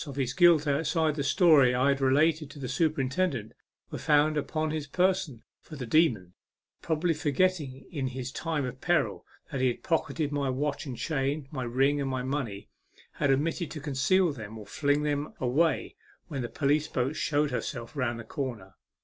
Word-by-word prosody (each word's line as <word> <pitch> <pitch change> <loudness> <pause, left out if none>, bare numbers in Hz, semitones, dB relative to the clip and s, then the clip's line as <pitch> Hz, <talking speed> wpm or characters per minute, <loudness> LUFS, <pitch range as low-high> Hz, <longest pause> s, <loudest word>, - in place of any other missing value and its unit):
of 140 - -7
his 130 -2 -1
guilt, 170 -1 +5
outside 155 +2 +1
the 145 -1 -2
story 140 -5 +5
I 130 +3 +3
had 140 0 +1
related 150 +3 +3
to 145 - -12
the 135 -3 -5
superintendent, 135 - 0 0.4
were - - -5
found 150 0 +3
upon 155 +1 -1
his 155 -2 -3
person, 180 -7 0 0.2
for 155 - -12
the 135 -3 -5
demon, 115 - +2 0.5
probably 165 +1 0
forgetting 150 -3 0
in 140 -6 -2
his 130 0 -5
time 155 -2 -2
of 125 +1 -7
peril 150 - 0 0.2
that 135 - -2
he 130 - +4
had 120 - -2
pocketed 160 -2 -1
my 140 -2 -1
watch 140 +3 -2
and 125 -3 -5
chain, 140 0 -2
my 130 - -4
ring, 135 +4 +2
and 135 - -2
my 130 -1 -2
money, 130 -7 -3 0.4
had 140 - -1
omitted 155 +5 0
to 155 - -6
conceal 150 +6 +2
them 110 -3 -8
or 105 - -9
fling 145 +7 0
them 145 0 -2
away 145 +7 +1 0.3
when 140 -4 -3
the 120 - -4
police 145 +1 +1
boat 130 +4 -1
showed 150 -1 0
herself 120 0 -4
round 120 -4 -1
the - - -6
corner. 110 -6 -5
140 Hz, 185 wpm, -28 LUFS, 130-155 Hz, 0.5 s, guilt